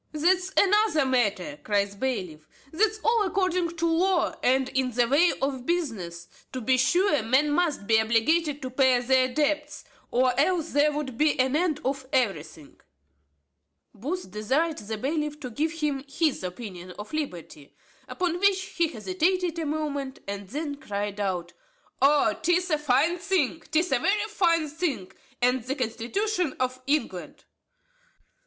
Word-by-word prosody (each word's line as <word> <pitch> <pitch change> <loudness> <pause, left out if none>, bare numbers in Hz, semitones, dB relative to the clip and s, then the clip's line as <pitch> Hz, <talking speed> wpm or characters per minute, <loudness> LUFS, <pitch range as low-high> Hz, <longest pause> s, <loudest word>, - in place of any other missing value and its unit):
"That's 365 +4 +2
another 400 -6 +4
matter," 260 +3 0
cries 200 -1 +1
the 200 - -14
bailiff; 180 -12 -3 0.2
"that's 430 +5 +1
all 460 0 +3
according 365 -3 0
to 335 - 0
law, 345 +2 +2
and 260 +1 +2
in 260 -1 0
the 240 0 +1
way 305 +7 +4
of 265 -2 -2
business. 200 - -3 0.3
To 260 - -3
be 255 +2 +2
sure, 345 - +3
men 265 +7 +2
must 300 -8 0
be 220 +1 +4
obliged 275 +7 +1
to 260 - -3
pay 260 -1 +4
their 255 +1 +2
debts, 300 +1 -1 0.3
or 255 0 +2
else 335 +1 +1
there 290 +1 +3
would 285 -5 -5
be 305 -2 +2
an 260 +2 +2
end 315 -2 0
of 265 0 -2
everything." 165 - -2 1.1
Booth 300 - -5
desired 270 - 0
the 215 +1 -5
bailiff 300 +4 -2
to 250 - -6
give 310 +7 -1
him 300 -4 -2
his 295 - 0
opinion 180 -2 -7
on 210 - -6
liberty. 175 - -6 0.3
Upon 355 -2 -2
which, 400 0 +3 0.2
he 340 -1 +3
hesitated 350 - -1
a 320 - -2
moment, 285 -3 -3
and 200 0 -5
then 290 +5 -4
cried 205 -4 -4
out, 180 -4 -2 0.5
"O 285 +1 +4
'tis 355 +2 +1
a 305 - +2
fine 300 +5 +2
thing, 345 -5 0
'tis 320 +1 +1
a 270 - +3
very 415 - +1
fine 335 -6 +2
thing, 290 - -3 0.3
and 250 +1 +3
the 260 +3 -3
constitution 295 - -2
of 255 0 -2
England." 295 +1 -2
285 Hz, 155 wpm, -26 LUFS, 245-335 Hz, 1.1 s, another